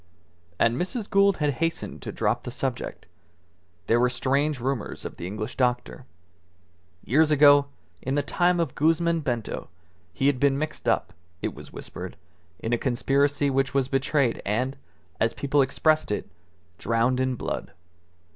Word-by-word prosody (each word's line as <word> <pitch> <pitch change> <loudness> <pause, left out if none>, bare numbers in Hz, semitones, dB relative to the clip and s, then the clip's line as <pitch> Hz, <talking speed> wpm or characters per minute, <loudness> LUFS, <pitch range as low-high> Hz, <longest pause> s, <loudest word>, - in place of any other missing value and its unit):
And 115 - +2
Mrs. 205 +4 -3
Gould 200 -1 +4
had 150 -1 +1
hastened 165 0 -2
to - - -5
drop - - 0
the - - -6
subject. - - -4 0.8
There 115 +6 +3
were 125 +1 +4
strange 140 +3 0
rumours 130 -2 -3
of - - -6
the 85 - -5
English 110 +5 -5
doctor. 125 0 -1 1.0
Years 155 +5 +4
ago, 145 -1 +6 0.3
in 130 +2 -2
the 145 - +1
time 175 +5 +2
of 165 -6 0
Guzman 165 +2 +2
Bento, 120 -7 -3 0.4
he 135 - -2
had 140 -2 +3
been 140 0 +3
mixed 155 -5 -2
up, 90 -5 0 0.3
it - - -1
was - - -12
whispered, - - -8 0.4
in 115 - -3
a 120 - +2
conspiracy 140 +2 +1
which 135 0 0
was 135 -1 +2
betrayed 135 -2 +1
and, 125 +7 -1 0.4
as 115 - +2
people 140 0 +1
expressed 155 +3 +2
it, 105 - -2 0.5
drowned 115 +3 +1
in 130 0 +1
blood. - - -4
135 Hz, 155 wpm, -26 LUFS, 125-150 Hz, 1.0 s, ago